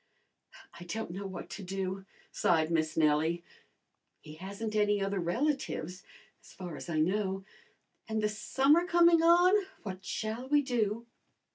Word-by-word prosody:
"I - - -8
don't 200 +2 -4
know 195 +3 -5
what 190 -2 -7
to 210 - -6
do," 190 0 -4 0.3
sighed 160 -1 +2
Miss 155 -1 0
Nellie. 160 +2 +2 0.8
"He 150 - -12
hasn't 200 +6 -6
any 205 -1 +3
other 195 0 -1
relatives 190 - -2 0.4
as - - -17
far 180 -4 -7
as 170 - -8
I 155 -2 0
know. 190 +3 0 0.6
And 220 -1 -1
the 210 - +2
summer 275 +10 +2
coming 340 -1 +5
on, 360 +4 +5 0.2
what 190 -3 -6
shall 220 +6 -4
we 290 0 +4
do?" 230 -3 -1
200 Hz, 145 wpm, -31 LUFS, 175-245 Hz, 0.8 s, coming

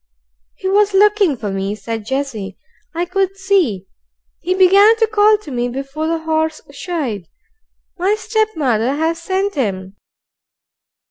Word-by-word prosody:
"He 380 - -5
was 405 +1 +2
looking 405 - +4
for 210 -3 -4
me," 195 +1 -2
said 215 +1 -6
Jessie. 240 -8 -4 0.4
"I 345 +1 0
could 385 +1 -1
see. 365 - +1 0.5
He 365 +1 -1
began 395 +4 +6
to 450 - +3
call 430 -1 +4
to 370 -9 -11
me 245 -1 -1
before 275 +5 -4
the 325 0 -2
horse 315 0 -1
shied. 280 - -4 0.7
My 385 +4 +2
stepmother 310 - 0
has 325 +2 -1
sent 385 +3 -1
him." 195 - -3
320 Hz, 135 wpm, -18 LUFS, 240-390 Hz, 0.7 s, began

